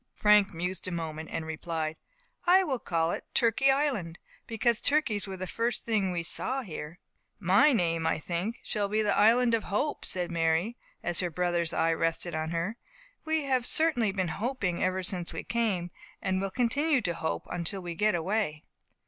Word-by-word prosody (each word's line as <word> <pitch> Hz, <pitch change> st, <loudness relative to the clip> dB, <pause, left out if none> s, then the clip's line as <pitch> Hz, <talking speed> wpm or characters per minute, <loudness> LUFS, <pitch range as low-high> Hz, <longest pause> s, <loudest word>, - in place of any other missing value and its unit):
Frank 210 Hz, -1 st, +5 dB
mused 180 Hz, +3 st, -3 dB
a -, -, -3 dB
moment, 160 Hz, -2 st, -4 dB
and 160 Hz, -, -3 dB
replied, 160 Hz, 0 st, -3 dB, 0.5 s
"I 375 Hz, +2 st, +7 dB
will 270 Hz, -8 st, -1 dB
call 165 Hz, -4 st, 0 dB
it -, -, -4 dB
Turkey 250 Hz, +3 st, +4 dB
Island; 265 Hz, -, 0 dB, 0.3 s
because 230 Hz, 0 st, +1 dB
turkeys 230 Hz, -10 st, +1 dB
were 190 Hz, -1 st, -6 dB
the 185 Hz, -, -4 dB
first 230 Hz, +6 st, -2 dB
thing 210 Hz, -5 st, +1 dB
we 170 Hz, -1 st, -2 dB
saw 260 Hz, +10 st, -1 dB
here." 160 Hz, -4 st, -7 dB, 0.4 s
"My 225 Hz, -, +5 dB
name, 165 Hz, -8 st, +1 dB
I -, -, +1 dB
think, 175 Hz, +8 st, -3 dB
will 205 Hz, -2 st, 0 dB
be 215 Hz, +1 st, +1 dB
the 205 Hz, -, +2 dB
Island 235 Hz, +2 st, +5 dB
of 225 Hz, -, +1 dB
Hope," 250 Hz, +9 st, -1 dB
said 180 Hz, -2 st, -2 dB
Mary, 165 Hz, +6 st, +1 dB, 0.3 s
as 175 Hz, -, +1 dB
her 180 Hz, -, +1 dB
brother's 175 Hz, 0 st, 0 dB
eye 165 Hz, 0 st, +2 dB
rested 165 Hz, +1 st, -1 dB
on 155 Hz, 0 st, -2 dB
her. 170 Hz, +7 st, -2 dB, 0.5 s
"We 315 Hz, -1 st, +1 dB
have 260 Hz, -3 st, +2 dB
certainly 290 Hz, -10 st, +2 dB
been 190 Hz, -3 st, -1 dB
hoping 200 Hz, -2 st, -2 dB
ever 185 Hz, 0 st, 0 dB
since 175 Hz, -2 st, -4 dB
we 165 Hz, -, -5 dB
came, 200 Hz, -7 st, -1 dB, 0.3 s
and 190 Hz, -1 st, -1 dB
will 195 Hz, -, -1 dB
continue 260 Hz, +6 st, +1 dB
to 175 Hz, -, -1 dB
hope 160 Hz, -1 st, -3 dB
until 175 Hz, +2 st, -2 dB
we 175 Hz, -1 st, -4 dB
get 210 Hz, +3 st, +2 dB
away." 175 Hz, -3 st, -1 dB
190 Hz, 180 wpm, -29 LUFS, 170-230 Hz, 0.5 s, I